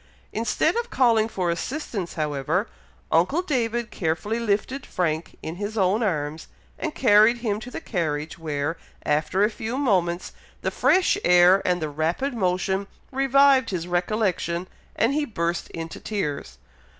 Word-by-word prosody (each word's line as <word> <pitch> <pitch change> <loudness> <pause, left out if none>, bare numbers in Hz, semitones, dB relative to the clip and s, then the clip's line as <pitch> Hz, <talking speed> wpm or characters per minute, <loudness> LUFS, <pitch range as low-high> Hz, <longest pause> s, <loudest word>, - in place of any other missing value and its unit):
Instead 230 - +1
of 475 0 -2
calling 230 -4 +3
for 180 -5 -1
assistance, 205 - -4
however, 155 - -1 0.4
uncle 230 - +3
David 240 -7 -1
carefully 185 +7 -1
lifted 235 +4 -1
Frank 160 -2 -2
in 165 +2 -5
his 205 +3 -4
own 195 +3 +2
arms, 155 -6 -2 0.3
and 320 -2 -3
carried 220 0 +5
him 215 -3 -2
to 240 - -8
the - - -6
carriage, 160 - -3
where, 155 0 -2 0.3
after 155 +6 +1
a 210 - +4
few 225 +4 -4
moments, 185 -10 0 0.3
the - - 0
fresh 370 0 +3
air, 180 +2 +6
and 180 -2 +1
the 155 - -2
rapid 165 - -1
motion 190 -1 0 0.2
revived 270 -1 +4
his 175 -3 -3
recollection, 180 -1 -1 0.3
and 230 +5 +2
he 300 +1 +1
burst 170 -9 -2
into 165 0 -7
tears. 145 - -4
195 Hz, 145 wpm, -24 LUFS, 170-235 Hz, 0.4 s, air